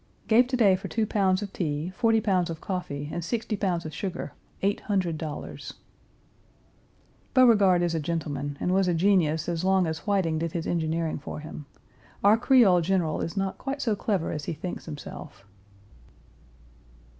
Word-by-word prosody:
Gave 240 Hz, +3 st, +5 dB
to 255 Hz, 0 st, -1 dB
day 200 Hz, -6 st, +5 dB
for 185 Hz, -, -6 dB
two 225 Hz, -2 st, 0 dB
pounds 195 Hz, -2 st, +1 dB
of 200 Hz, -, -7 dB
tea, 155 Hz, 0 st, -2 dB
forty 225 Hz, -1 st, +3 dB
pounds 185 Hz, -5 st, +1 dB
of 165 Hz, -1 st, -5 dB
coffee, 145 Hz, -7 st, -4 dB
and 170 Hz, -, -3 dB
sixty 225 Hz, +3 st, -2 dB
pounds 180 Hz, -4 st, -1 dB
of 155 Hz, -, -6 dB
sugar, 175 Hz, +3 st, -5 dB, 0.3 s
$800. 180 Hz, -6 st, -2 dB, 1.6 s
Beauregard 205 Hz, -8 st, +5 dB
is 170 Hz, -1 st, 0 dB
a 165 Hz, -, 0 dB
gentleman 145 Hz, -3 st, -3 dB
and 180 Hz, -, 0 dB
was 190 Hz, -1 st, +3 dB
a 175 Hz, -, +2 dB
genius 165 Hz, -4 st, +2 dB
as 170 Hz, 0 st, -2 dB
long 190 Hz, -1 st, +3 dB
as 160 Hz, +4 st, -5 dB
Whiting 180 Hz, -6 st, +1 dB
did 165 Hz, 0 st, -3 dB
his 165 Hz, -2 st, -3 dB
engineering 160 Hz, -1 st, -1 dB
for 145 Hz, -, -7 dB
him. 150 Hz, -1 st, -9 dB, 0.6 s
Our 205 Hz, +2 st, +7 dB
Creole 230 Hz, -9 st, +5 dB
general 170 Hz, -3 st, 0 dB
is 165 Hz, -, -4 dB
not 195 Hz, -1 st, -2 dB
quite 275 Hz, +1 st, -4 dB
so 225 Hz, -6 st, 0 dB
clever 195 Hz, -4 st, -1 dB
as 150 Hz, -1 st, -4 dB
he -, -, -2 dB
thinks 175 Hz, +3 st, -6 dB
himself. 145 Hz, -9 st, -9 dB
180 Hz, 165 wpm, -27 LUFS, 160-200 Hz, 1.6 s, Our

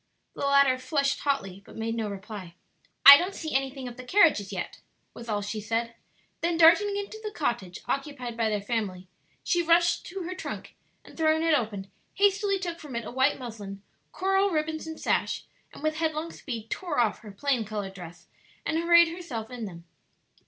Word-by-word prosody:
The 280 Hz, -, -2 dB
latter 280 Hz, -2 st, +4 dB
flushed 280 Hz, 0 st, 0 dB
hotly 195 Hz, -10 st, -2 dB
but -, -, -15 dB
made 225 Hz, 0 st, -2 dB
no 225 Hz, -2 st, -2 dB
reply. 195 Hz, -3 st, -8 dB, 0.5 s
"I 280 Hz, 0 st, +14 dB
don't 365 Hz, +4 st, -2 dB
see 315 Hz, -1 st, -5 dB
anything 270 Hz, -1 st, -1 dB
of 245 Hz, 0 st, -9 dB
the 255 Hz, -, -8 dB
carriages 300 Hz, -, +3 dB
yet," -, -, -5 dB, 0.3 s
was 235 Hz, 0 st, -10 dB
all 205 Hz, -1 st, -1 dB
she 210 Hz, +1 st, -4 dB
said; 230 Hz, +2 st, -2 dB, 0.5 s
then 340 Hz, 0 st, 0 dB
darting 360 Hz, +5 st, +6 dB
into 405 Hz, +2 st, -5 dB
the 425 Hz, -, -3 dB
cottage 235 Hz, -, -3 dB
occupied 275 Hz, -4 st, -3 dB
by 225 Hz, -1 st, +1 dB
their 210 Hz, -2 st, -2 dB
family, 200 Hz, -5 st, -3 dB, 0.4 s
she 350 Hz, -, +2 dB
rushed 340 Hz, 0 st, +3 dB
to 380 Hz, +1 st, -5 dB
her 360 Hz, +2 st, -4 dB
trunk, 370 Hz, -, -7 dB, 0.3 s
and -, -, -15 dB
throwing 315 Hz, 0 st, +2 dB
it 330 Hz, -1 st, +3 dB
open, 210 Hz, -8 st, -1 dB, 0.2 s
hastily 400 Hz, 0 st, +2 dB
took 345 Hz, -3 st, -5 dB
from 295 Hz, -6 st, -9 dB
it 235 Hz, -1 st, -3 dB
a -, -, -6 dB
white 265 Hz, +3 st, +2 dB
muslin, 205 Hz, -6 st, -8 dB, 0.3 s
coral 385 Hz, +1 st, +2 dB
ribbons 315 Hz, -1 st, -2 dB
and 320 Hz, 0 st, -7 dB
sash, -, -, 0 dB, 0.3 s
and -, -, -13 dB
with 310 Hz, 0 st, 0 dB
headlong 320 Hz, 0 st, -1 dB
speed 225 Hz, -5 st, -7 dB
tore 345 Hz, -6 st, -3 dB
off 225 Hz, -3 st, +2 dB
her 215 Hz, -2 st, -11 dB
plain 250 Hz, +3 st, 0 dB
colored 205 Hz, -2 st, -5 dB
dress 175 Hz, -2 st, -11 dB, 0.4 s
and 320 Hz, -, 0 dB
arrayed 340 Hz, 0 st, +6 dB
herself 280 Hz, -10 st, -6 dB
in 245 Hz, -3 st, -5 dB
them. 170 Hz, -4 st, -10 dB
270 Hz, 190 wpm, -27 LUFS, 215-330 Hz, 0.5 s, I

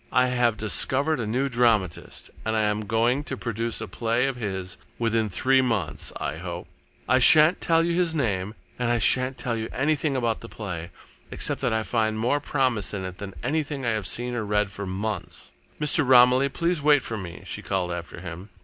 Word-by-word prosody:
I 125 Hz, 0 st, +3 dB
have 120 Hz, -3 st, +1 dB
discovered 135 Hz, -, +1 dB
a 115 Hz, -, -2 dB
new 130 Hz, +5 st, 0 dB
dramatist, 115 Hz, -8 st, 0 dB
and 110 Hz, 0 st, -1 dB
I 110 Hz, -, +2 dB
am 105 Hz, 0 st, -1 dB
going 120 Hz, +6 st, +1 dB
to 130 Hz, -, -4 dB
produce 115 Hz, -1 st, -3 dB
a -, -, -4 dB
play 115 Hz, +2 st, 0 dB
of 135 Hz, -1 st, -1 dB
his 95 Hz, -5 st, -5 dB, 0.2 s
within 115 Hz, -2 st, 0 dB
three 130 Hz, +7 st, +3 dB
months, 105 Hz, -, -1 dB
I 75 Hz, -, -4 dB
hope. 85 Hz, 0 st, -6 dB, 0.4 s
I 130 Hz, +1 st, +4 dB
shan't 155 Hz, +6 st, +7 dB
tell 165 Hz, -1 st, +3 dB
you 170 Hz, 0 st, 0 dB
his 170 Hz, -2 st, +1 dB
name 105 Hz, -7 st, -1 dB, 0.2 s
and 125 Hz, -1 st, 0 dB
I 120 Hz, -, +2 dB
shan't 130 Hz, +3 st, +2 dB
tell 120 Hz, -1 st, -2 dB
you 110 Hz, 0 st, -4 dB
anything 145 Hz, +1 st, 0 dB
about 120 Hz, -3 st, -1 dB
the 115 Hz, -, -9 dB
play, 90 Hz, -6 st, -6 dB, 0.4 s
except -, -, -1 dB
that -, -, +1 dB
I 110 Hz, 0 st, 0 dB
find 110 Hz, -1 st, 0 dB
more 125 Hz, +6 st, +1 dB
promise 130 Hz, -8 st, -1 dB
in 95 Hz, -2 st, -4 dB
it 95 Hz, -1 st, -8 dB
than 100 Hz, -2 st, -7 dB
anything 145 Hz, -3 st, -2 dB
I 115 Hz, -, +2 dB
have 110 Hz, -3 st, -2 dB
seen 125 Hz, +1 st, -2 dB
or 120 Hz, -2 st, -2 dB
read 105 Hz, 0 st, 0 dB
for 100 Hz, 0 st, -6 dB
months. 100 Hz, +1 st, -5 dB, 0.3 s
Mr. 150 Hz, +1 st, +2 dB
Romilly, 125 Hz, +1 st, +5 dB
please 170 Hz, +2 st, -1 dB
wait 145 Hz, -2 st, +4 dB
for 115 Hz, -, -4 dB
me," 90 Hz, -5 st, -8 dB
she -, -, -5 dB
called 95 Hz, -3 st, -2 dB
after 85 Hz, -1 st, -6 dB
him. 90 Hz, +2 st, -8 dB
115 Hz, 205 wpm, -25 LUFS, 105-130 Hz, 0.4 s, shan't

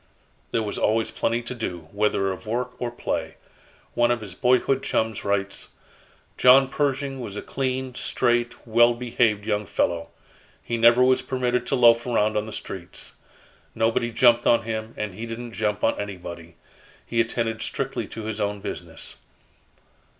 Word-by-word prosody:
There 115 Hz, -, 0 dB
was 105 Hz, -, -4 dB
always 110 Hz, +1 st, +1 dB
plenty 115 Hz, +1 st, -1 dB
to 120 Hz, -, -5 dB
do, 90 Hz, -9 st, -5 dB
whether 100 Hz, -2 st, +1 dB
of 95 Hz, +4 st, -8 dB
work 125 Hz, +3 st, -1 dB
or 120 Hz, -, -1 dB
play. 120 Hz, -, -3 dB, 0.6 s
One 120 Hz, 0 st, +3 dB
of 120 Hz, -1 st, +1 dB
his 100 Hz, -4 st, -8 dB
boyhood 130 Hz, +5 st, +2 dB
chums 110 Hz, -4 st, -1 dB
writes: 100 Hz, -1 st, -2 dB, 0.7 s
"John 130 Hz, +1 st, +7 dB
Pershing 140 Hz, -1 st, -1 dB
was 105 Hz, -5 st, -6 dB
a -, -, -3 dB
clean, 130 Hz, -1 st, -2 dB
straight, 120 Hz, -1 st, 0 dB
well 120 Hz, +1 st, +4 dB
behaved 115 Hz, -4 st, +1 dB
young 105 Hz, -2 st, -1 dB
fellow. 85 Hz, -4 st, 0 dB, 0.6 s
He 120 Hz, -, -2 dB
never 120 Hz, +2 st, +6 dB
was 130 Hz, 0 st, +4 dB
permitted 125 Hz, -1 st, -1 dB
to 140 Hz, -, +1 dB
loaf 120 Hz, -1 st, +5 dB
around 110 Hz, -3 st, +1 dB
on 105 Hz, +1 st, -1 dB
the -, -, -7 dB
streets. 90 Hz, -3 st, -7 dB, 0.6 s
Nobody 115 Hz, +1 st, +1 dB
jumped 120 Hz, 0 st, +4 dB
on 115 Hz, -, +4 dB
him, 110 Hz, 0 st, -4 dB
and 105 Hz, -3 st, -3 dB
he 115 Hz, +5 st, -6 dB
didn't 115 Hz, +1 st, -6 dB
jump 105 Hz, -2 st, -1 dB
on -, -, +2 dB
anybody. 85 Hz, -4 st, -8 dB, 0.5 s
He 115 Hz, -1 st, +1 dB
attended 115 Hz, -1 st, -2 dB
strictly 135 Hz, +2 st, -3 dB
to 110 Hz, -, -7 dB
his 110 Hz, 0 st, -4 dB
own 105 Hz, 0 st, -1 dB
business. -, -, -7 dB
115 Hz, 160 wpm, -24 LUFS, 105-125 Hz, 0.7 s, John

